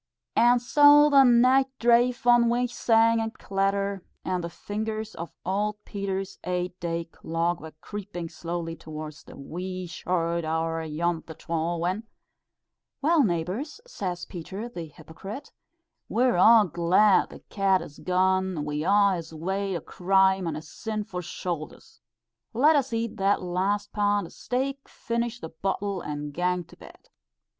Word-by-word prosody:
"And 240 +1 +5
so 290 +4 +6
the 275 -1 +8
nicht 255 +2 +5
drave 240 +1 +3
on 240 -1 +5
wi' 240 +1 +2
sangs 230 -1 +3
and 225 0 -4
clatter," 195 0 -1 0.2
and 180 -1 -1
the 170 - -3
fingers 215 +3 -4
of 170 +1 -7
old 205 +3 -1
Peter's 195 -1 -4
eight 180 0 -3
day 170 -1 -2
clock 165 +1 -2
were 160 -1 -10
creeping 200 -5 -6
slowly 165 0 -5
towards 155 -1 -8
"the - - -13
wee 185 +6 -5
short 170 -1 -1
hour 165 +1 -1
ayont 165 +2 -2
the 160 - -8
twal," 165 +1 -2
when, 185 +6 -2 1.0
"Well, 325 +1 +4
neighbours," 195 - -2
says 180 - -4
Peter, 190 +6 -7
the 175 -9 -7
hypocrite, 160 - -10 0.6
"we're 245 +1 +2
a' 215 +4 +7
glad 180 +5 +3
the - - -12
cat 195 -2 +2
has 145 - -11
gane 185 -3 +1
we 150 0 -2
a' 200 +2 +4
his 160 -1 -8
weight 190 +4 -2
o' 170 - -3
crime 190 0 +2
on 160 - -2
his 155 0 -7
sinfu' 215 -3 -5
shou'ders. 170 -2 -6 0.5
Let 295 +7 +5
us 270 -3 +1
eat 230 -1 -2
that 195 0 +2
last 195 +3 -1
pound 205 -2 +1
o' - - -10
steak, 270 +2 -3
finish 235 0 -3
the 160 - -7
bottle, 195 +3 -2
and 145 0 -5
gang 180 +2 0
to - - -17
bed." - - -16
190 Hz, 150 wpm, -26 LUFS, 170-225 Hz, 1.0 s, the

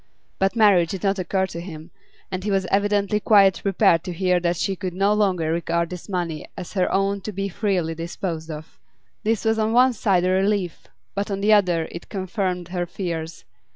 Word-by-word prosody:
But 195 +3 +1
marriage 200 -7 +5
did 190 - -5
not 195 0 +1
occur 190 +1 0
to 170 -2 -7
him, 165 -2 -9 0.4
and 185 0 -3
he 210 - -2
was 195 -1 +1
evidently 205 +1 +2
quite 200 -3 +5
prepared 195 -4 +3
to 180 - -3
hear 180 0 +2
that 175 0 0
she 195 - -1
could 185 -1 -5
no 200 +2 +3
longer 185 -6 +1
regard 170 0 -1
this 180 +2 -8
money 175 -5 -3
as 180 -3 -7
her 185 -3 +1
own 195 +1 +1
to 215 - -5
be 195 0 -3
freely 180 -4 -1
disposed 165 0 -5
of. 155 0 -9 0.4
This 225 +1 0
was 220 0 +2
on 220 +1 +1
one 250 +1 +5
side 195 -5 +2
a 185 - +2
relief 190 -2 0 0.3
but 200 +2 -2
on 195 -1 -2
the 215 +2 +4
other 175 -6 +3
it 170 - -9
confirmed 185 -3 -3
her 175 -1 -2
fears. 165 -5 -5
190 Hz, 200 wpm, -23 LUFS, 170-200 Hz, 0.4 s, marriage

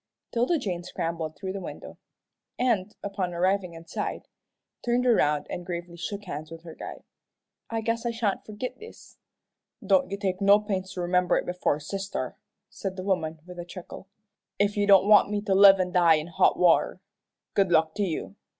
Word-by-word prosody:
'Tilda 245 +8 +2
Jane 185 - -3
scrambled 165 -3 -4
through 190 +6 -5
the 195 - -5
window, - - -9 0.6
and, 220 -5 0
upon 195 -3 -3
arriving 185 0 0
inside, 165 0 -5 0.6
turned 245 +1 +1
around 150 -11 +3
and 175 - -5
gravely 175 -1 -6
shook 200 +4 -5
hands 150 -2 -6
with 165 0 -10
her 165 -2 -9
guide. - - -9 0.7
"I 225 -1 -2
guess 230 +1 -1
I 240 - 0
sha'n't 230 -4 -1
forgit 215 +4 -6
this." 445 +2 -14 0.7
"Don't 190 -2 +3
you 200 - -3
take 190 -1 -2
no 200 +1 +6
pains 190 -3 -3
to 180 - -4
remember 180 +1 +2
it - - -2
before 180 -4 0
sister," 195 +6 -4 0.3
said 190 -2 -6
the 185 - -6
woman, 165 -5 -1
with 180 -1 -10
a - - -4
chuckle, 180 +2 -10 0.5
"if 205 0 +1
you 205 -1 +1
don't 195 -1 +6
want 210 -1 +6
me 210 0 -1
to 205 -2 0
live 195 0 +8
an' 180 -1 0
die 170 -2 +5
in 155 0 -2
hot 170 - +2
water. 180 +1 +3 0.5
Good 195 -3 +2
luck 160 -1 +3
to 205 - -1
you. 100 - -3
190 Hz, 185 wpm, -27 LUFS, 175-205 Hz, 0.7 s, live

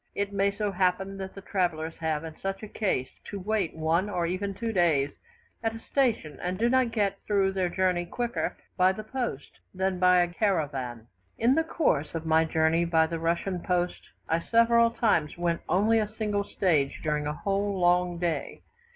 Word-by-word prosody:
It 200 0 -2
may 200 0 +2
so 205 +1 -2
happen 190 +1 0
that 190 -1 -7
travellers 165 -4 -1
have 160 -2 -1
in 160 -1 -7
such 195 +2 -4
a - - -5
case 190 - -1
to 200 - -6
wait 200 -3 -1
one 165 +5 +1
or 175 -4 -1
even 190 +3 -2
two 225 +3 -3
days 160 -7 +2 0.5
at 225 0 -1
a - - -7
station, 225 - 0
and 180 +1 -2
do 235 +3 +2
not 260 -1 +3
get 200 -3 0
through 195 -2 +2
their 190 -2 0
journey 180 -1 0
quicker 240 +5 -2 0.2
by 185 0 +4
the 215 - -7
post 235 - -5 0.2
than 190 0 0
by 180 0 +5
a 175 - +2
caravan. 140 - -1 0.3
In 235 +3 +4
the 325 +3 +2
course 170 - 0
of 165 0 -4
my 160 0 +4
journey 160 +1 +2
by 165 -1 +3
the 165 0 -4
Russian 170 +3 -1
post, 180 0 -2 0.2
I 165 - +1
several 230 +4 +4
times 175 -11 +1
went 170 -1 0
only 215 +5 +3
a 210 -1 -2
single 205 -2 -1
stage 155 -10 0
during 150 -1 0
a 150 - -1
whole 200 0 -1
long 175 0 +3
day. 170 -2 -3
185 Hz, 185 wpm, -28 LUFS, 165-205 Hz, 0.5 s, by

